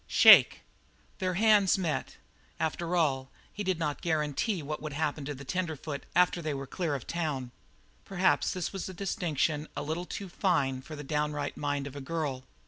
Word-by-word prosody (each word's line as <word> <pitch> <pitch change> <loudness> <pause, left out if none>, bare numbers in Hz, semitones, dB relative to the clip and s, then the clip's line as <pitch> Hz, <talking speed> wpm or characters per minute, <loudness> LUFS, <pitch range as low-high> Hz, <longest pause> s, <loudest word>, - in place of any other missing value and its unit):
"Shake." - - +8 0.6
Their 185 -1 -1
hands 210 -2 +5
met. 170 -5 -2 0.4
After 170 +2 -1
all, 135 -6 +1 0.2
he 210 - -4
did 185 -3 0
not 150 -3 -2
guarantee 160 +3 0
what 150 +2 -4
would 155 -1 -5
happen 150 -1 -2
to 145 +1 -4
the 140 +1 -10
tenderfoot 155 -2 -4
after 180 -1 +3
they 155 -3 -2
were 135 0 -5
clear 160 +1 -2
of 135 - -6
the - - -6
town. 145 -7 -2 0.5
But - - -24
perhaps 190 -1 +2
this 180 +1 -3
was 195 -1 -4
a 185 - -8
distinction 160 -5 -1
a - - -2
little 160 +4 -3
too 200 +2 -6
fine 140 -8 0
for 155 +4 -9
the 145 - -7
downright 150 0 -2
mind 145 -1 -2
of 140 - -7
the 140 - -7
girl. 135 -3 -3
155 Hz, 190 wpm, -30 LUFS, 145-180 Hz, 0.6 s, Shake